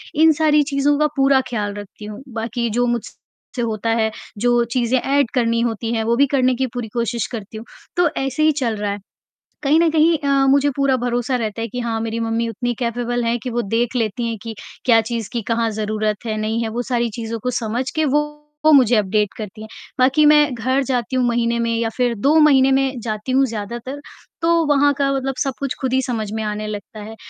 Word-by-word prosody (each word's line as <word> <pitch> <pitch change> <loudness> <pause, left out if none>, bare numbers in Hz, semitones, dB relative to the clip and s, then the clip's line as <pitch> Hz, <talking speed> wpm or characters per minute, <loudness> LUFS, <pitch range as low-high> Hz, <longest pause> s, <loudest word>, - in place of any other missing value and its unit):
इन 320 +1 +6
सारी 300 -1 +3
चीज़ों 285 0 +1
का 305 - +4
पूरा 270 0 +4
ख्याल 210 -4 -2
रखती 205 +1 -9
हूँ, 210 +4 -8
बाकी 235 +1 -2
जो 245 +3 +1
मुझसे 240 +1 -6
होता 225 -1 -2
है, 225 -1 +1 0.3
जो 240 +2 +2
चीजें 250 0 +2
एड 275 -1 +1
करनी 230 -3 +1
होती 230 -1 -2
हैं, 225 -1 0
वो 230 +1 +1
भी 280 - +4
करने 255 -1 +3
की 260 +1 -1
पूरी 245 -2 -4
कोशिश 235 -2 -1
करती 220 -2 -7
हूँ, 225 - -9 0.3
तो 355 -1 +4
ऐसे 270 +3 -1
ही 310 - +5
चल 230 -3 0
रहा 205 0 -2
है। 200 - -4 0.6
कहीं 295 +3 +4
न 335 - +4
कहीं 320 +1 +4
अ, 275 -1 +2
मुझे 280 +1 +4
पूरा 275 -1 +3
भरोसा 245 +1 -1
रहता 225 -2 -3
है 230 - -2
कि 245 +3 -6
हाँ, 230 -2 -2
मेरी 225 0 -3
मम्मी 230 0 -1
उतनी 240 +2 -2
कैपेबल 240 0 -1
हैं 230 +1 +1
कि 255 - -3
वो 240 0 -1
देख 230 +3 -1
लेती 230 0 -1
हैं 230 -1 -3
कि 225 -1 -6 0.3
क्या 230 -3 +6
चीज़ 230 -1 -4
की 235 - -1
कहाँ 230 0 +1
ज़रूरत 215 +1 -2
है, 215 -1 -2
नहीं 220 +2 -1
है, 225 - -2
वो 235 +2 -3
सारी 240 -2 -1
चीज़ों 225 +1 -5
को 250 - -2
समझ 235 +4 -2
के 315 - +2
वो 295 +1 +3 0.5
मुझे 250 -4 +6
अपडेट 210 0 +1
करती 215 0 -7
हैं, 220 - -8 0.3
बाकी 270 +4 +4
मैं 295 -2 +5
घर 260 +4 0
जाती 250 0 -1
हूँ 255 - +2
महीने 235 0 +1
में 230 0 0
या 230 0 0
फिर 245 -2 +2
2 275 +8 +2
महीने 270 -3 +5
में 265 -1 +1
जाती 215 +2 -4
हूँ 270 +1 +4
ज्यादातर, 235 +4 -5 0.4
तो 335 -1 +3
वहाँ 285 0 +3
का 275 -1 +1
मतलब 270 0 -2
सब 270 - -2
कुछ 275 -2 -2
खुद 260 -1 -1
ही 265 - +3
समझ 225 -5 -3
में 220 0 -2
आने 210 0 -3
लगता 210 +1 -7
है, 220 +1 -9
240 Hz, 225 wpm, -20 LUFS, 225-270 Hz, 0.6 s, इन